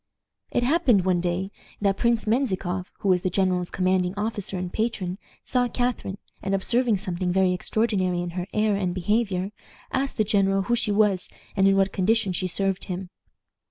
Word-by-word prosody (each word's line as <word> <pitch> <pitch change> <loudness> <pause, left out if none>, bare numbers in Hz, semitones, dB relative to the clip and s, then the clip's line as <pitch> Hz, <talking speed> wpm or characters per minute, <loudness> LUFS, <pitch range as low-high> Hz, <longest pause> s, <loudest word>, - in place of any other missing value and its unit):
"It 240 - 0
happened 250 - +3
one 180 -2 +2
day 180 +2 -1 0.3
that 200 -1 +2
Prince 235 +1 +1
Menzikoff, 190 -6 -1
who 200 - +1
was 180 -1 +4
the 185 - 0
general's 180 -1 +1
commanding 185 0 +1
officer 205 -2 -2
and 180 0 -4
patron, 210 -5 -2 0.2
saw 250 -1 +1
Catharine, 245 -6 -2 0.2
and, 195 0 0
observing 235 +3 +1
something 185 -2 -2
very 185 0 +3
extraordinary 185 -2 0
in 175 0 -3
her 180 +1 -4
air 210 -1 +2
and 185 -3 -1
behavior, 195 0 0 0.4
asked 270 +1 -1
the 215 - +4
general 195 -2 +2
who 240 +5 +1
she 220 - 0
was 205 -3 +2 0.3
and 195 -1 +4
in 195 0 +4
what 195 0 +2
condition 200 0 +2
she 185 +1 -1
served 195 +1 0
him. 180 0 -5
195 Hz, 175 wpm, -25 LUFS, 185-215 Hz, 0.4 s, was